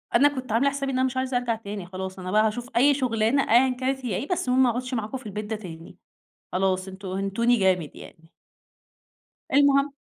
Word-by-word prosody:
أنا 290 - +6
كنت 255 -3 -5
عاملة 240 +6 +3
حسابي 275 -1 -3
إن 255 - -1
أنا 260 - +3
مش 260 0 -3
عايزة 260 -1 0
أرجع 245 -2 -1
تاني 205 -4 -7
خلاص، 190 +1 -7
أنا 185 0 -5
بقى 215 +1 +4
هاشوف 240 +3 -4
أي 285 +4 +5
شُغلانة 250 0 +1
أيًا 255 +3 +6
كانت 265 0 -2
هي 210 - -1
إيه، 250 +10 -3
بس 360 -8 -2
المهم 255 +1 +4
ما 245 - +4
أقعدش 250 +2 -3
معاكم 225 +2 -3
في 255 - -14
البيت 210 +1 -5
ده 220 +1 -3
تاني، 170 -5 -10 0.5
خلاص 185 0 0
أنتم 190 +1 -9
هِنتوني 195 +6 +1
جامد 185 -5 +1
يعني. 165 0 -14 1.2
المهم 280 0 +4
230 Hz, 210 wpm, -25 LUFS, 195-260 Hz, 1.2 s, أنا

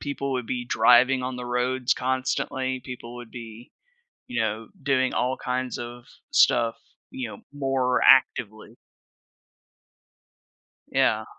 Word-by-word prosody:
people 140 -1 -3
would 125 -3 -2
be 120 0 -3
driving 125 +3 +5
on 125 0 -4
the 125 - -6
roads 125 +1 0
constantly. 130 0 -2
People 120 -2 -8
would 120 -2 -10
be, 115 0 -10 0.5
you 250 - -2
know, 110 +1 -2
doing 130 -2 +1
all 130 +1 0
kinds 125 0 -3
of 120 0 -8 0.3
stuff, 115 -1 +4 0.4
you 265 -1 -5
know, - - -9
more 135 -3 0
actively. 115 -4 +3 2.2
Yeah. - - +2
125 Hz, 120 wpm, -25 LUFS, 120-130 Hz, 2.2 s, driving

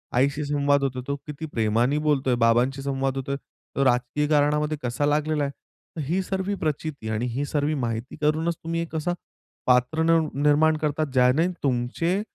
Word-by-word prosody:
आईशी 140 +4 +2
संवाद 145 -1 +2
होतोय, 130 -2 -1
तो 140 - -1
किती 150 +1 -6
प्रेमाने 120 +1 +1
बोलतोय, 140 -4 +1
बाबांशी 125 +4 +3
संवाद 135 -1 -1
होतोय, 140 +1 -2 0.4
तो 140 - +2
राजकीय 125 +4 +1
कारणामध्ये 150 0 +2
कसा 125 +4 -1
लागलेला 150 0 +1
आहे. 140 - -1
तर, 155 - -12
ही 180 +5 +1
सगळी 190 +1 -2
प्रचिती 150 -7 -3
आणि 110 +2 -1
ही 145 - -1
सगळी 145 +1 0
माहिती 115 +2 -4
करूनच 160 +3 +1
तुम्ही 165 +1 -2
कसा 160 +2 -1 0.5
पात्र 125 +6 +3
निर 165 0 +4 0.2
निर्माण 155 +2 +4
करतात. 150 0 0
ज्याने 130 +6 +4 0.2
तुमचे 140 +9 0
145 Hz, 160 wpm, -25 LUFS, 130-155 Hz, 0.5 s, निर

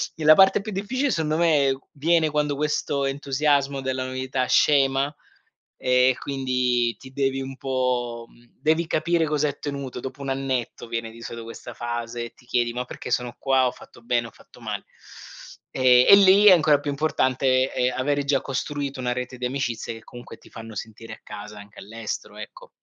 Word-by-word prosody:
e 160 - -6
la 155 - +9
parte 195 +4 +5
più 215 - -6
difficile 250 +8 -1
sondo 155 -1 0
me 145 -6 +3
viene 160 +1 +2
quando 150 -1 0
questo 145 -1 -1
entusiasmo 140 0 0
della 130 0 -2
novità 130 0 -2
scema 140 0 +3 0.6
e 125 0 +3
quindi 125 -3 0
ti 130 0 -13
devi 135 -1 0
un 135 0 -6
po' 125 -3 -2 0.3
devi 160 +3 +1
capire 165 +1 +1
cosa 150 -1 0
hai 145 - -1
ottenuto 140 -3 -6
dopo 130 +2 -7
un 140 - -5
annetto, 130 -3 -3
viene 115 -1 -4
di 115 - -13
solito 115 0 -7
questa 115 - -9
fase 120 0 -4
e 115 - -9
ti 125 - -23
chiedi: 120 -1 0
"Ma 125 +1 -3
perché - - -8
sono 125 -1 -1
qua, 135 -1 +2
ho - - +1
fatto - - -16
bene 120 0 0
ho - - -14
fatto - - -19
male?" - - -5 0.9
E 125 -1 +5
e - - +11
lì 200 +1 +6
è 200 - +10
ancora 155 -4 +5
più 145 - -3
importante, 130 -3 +1
ehm, 125 0 0
avere 145 +2 0
già 140 -1 +2
costruito 140 0 -4
una 125 -1 -1
rete 125 0 -5
di 125 - -2
amicizie 120 -3 -3
che 115 - -13
comunque 120 0 -11
ti - - -19
fanno 115 -1 -10
sentire 110 +2 -8
a - - -18
casa 105 0 -9
anche 100 0 -14
all'estero, 105 0 -6
ecco. 105 - -10
130 Hz, 185 wpm, -24 LUFS, 120-145 Hz, 0.9 s, e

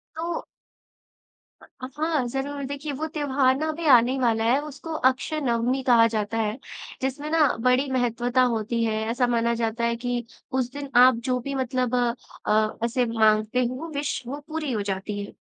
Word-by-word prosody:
तो 335 +1 -3 1.4
हाँ, 295 +2 -1
ज़रूर। 275 +3 -4
देखिए 285 +2 -5
वो 310 +4 -3
त्योहार 285 +1 +1
भी 335 +1 -5
आने 245 -1 +6
ही 270 - -1
वाला 225 -3 +2
है, 245 +5 +3
उसको 305 +2 -7 0.2
अक्षय 305 +4 -3
नवमी 245 +1 0
कहा 235 -3 +6
जाता 220 0 -2
है। 215 0 -1 0.4
जिसमें 275 +3 -3
ना 315 -2 +4
बड़ी 255 +3 +2
महत्वता 245 0 +1
होती 230 +1 -1
है। 220 -1 0
ऐसा 245 +1 +1
माना 235 -1 +1
जाता 230 0 -2
है 235 0 +1
कि 240 0 -3 0.3
उस 255 -1 -1
दिन 285 -1 -6
आप 255 -1 +7
जो 255 -1 +1
भी 275 +3 -5
मतलब 255 -1 -1 0.5
अ, 215 0 +3 0.2
ऐसे 245 +1 +1
माँगते 220 +1 +2
हो 255 +7 -4
विश 285 -2 -2
वो 280 +4 -5
पूरी 310 -3 -3
हो 215 -3 -1
जाती 200 +1 -3
है। - - -12
250 Hz, 170 wpm, -25 LUFS, 230-280 Hz, 1.4 s, आप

